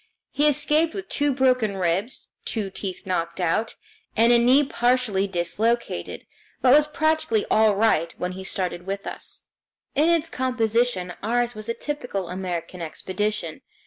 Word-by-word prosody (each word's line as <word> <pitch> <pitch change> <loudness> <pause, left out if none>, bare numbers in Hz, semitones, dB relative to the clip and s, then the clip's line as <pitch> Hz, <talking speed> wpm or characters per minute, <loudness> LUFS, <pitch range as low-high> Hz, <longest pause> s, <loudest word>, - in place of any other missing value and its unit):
He 295 +1 +3
escaped 300 +3 +2
with 390 -1 -6
two 290 0 +1
broken 255 -6 +2
ribs, 185 +7 -1
two 210 -4 -3
teeth 190 -1 -6
knocked 170 -2 -2
out, 185 +6 0 0.4
and 230 +2 +6
a 240 - +6
knee 255 +5 +5
partially 245 -7 +1
dislocated, 195 +7 -2 0.3
but 255 -1 +5
was 300 +1 +6
practically 315 -8 +1
all 215 -1 +4
right 195 -6 +2
again - - -24
when 180 0 -2
he 190 +1 -7
started 180 -2 -3
with 195 0 -4
us. - - -5 0.5
In 305 +4 +3
its 335 -1 +2
composition 235 - 0
ours 240 +2 0
was 215 +1 -6
a 230 - -1
typical 245 -11 -4
American 180 -1 -4
expedition. 185 +1 -3
220 Hz, 150 wpm, -24 LUFS, 185-255 Hz, 0.5 s, and